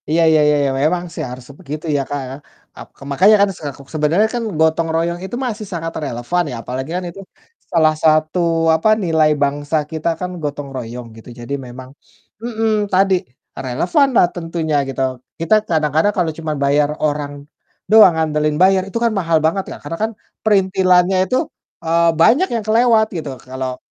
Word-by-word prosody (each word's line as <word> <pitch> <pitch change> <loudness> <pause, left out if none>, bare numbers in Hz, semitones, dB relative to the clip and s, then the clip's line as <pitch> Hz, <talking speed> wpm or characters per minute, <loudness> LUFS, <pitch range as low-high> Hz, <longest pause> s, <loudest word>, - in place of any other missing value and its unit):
Iya 165 +2 +2
iya 160 -1 +4
iya 150 - +4
iya, 135 - +1
memang 175 +4 +1
sih - - -5
harus 125 0 -9
begitu 150 +3 -7
ya, 140 - +1
Kak, 145 -1 -3
ya. 130 - -6 0.4
Ak - - -10
ke - - -13
makanya 195 +10 +5
kan 200 - +2
sek 145 -3 -6 0.2
sebenarnya 160 +7 +2
kan 240 - -2 0.2
gotong 160 +1 +2
royong 170 +1 -1
itu 190 - -6
masih 220 -3 -4
sangat 165 -1 -4
relevan 140 +7 -1
ya 125 - -5
apalagi 130 +3 -5
kan 180 - -2
itu 170 - -11 0.5
salah 160 -3 +4
satu, 155 +2 +3 0.4
apa, 215 +7 +1
nilai 160 -3 +3
bangsa 145 +2 0
kita 160 +1 -2
kan, 180 - -3
gotong 145 -1 -4
royong 120 -1 -6
gitu. 115 - -13
Jadi 120 +4 -6
memang 130 +1 -10 0.5
mhm, 220 -3 -1
tadi 190 +1 +4 0.4
relevanlah 175 - +2
tentunya 165 -2 -3
gitu. 135 - -4 0.4
Kita 165 +6 +3
kadang-kadang 160 +4 +1
kalau 170 -3 +1
cuma 160 -2 -4
bayar 145 +1 +2 0.2
orang 145 -1 -3 0.5
doang, 215 -6 +7
andelin 150 -1 0
bayar 190 0 +4
itu 195 - -4
kan 235 - +2
mahal 165 -3 +2
banget 190 +5 +1
ya, - - -7
karena 165 +3 -5
kan 220 - 0 0.3
perintilannya 190 -3 +3
itu, 255 - +2 0.5
eee, 170 +1 +3
banyak 280 - +5
yang 225 - -2
kelewat 225 0 +4
gitu. 155 -4 -4 0.2
Kalau 130 0 -4
160 Hz, 175 wpm, -18 LUFS, 145-190 Hz, 0.5 s, doang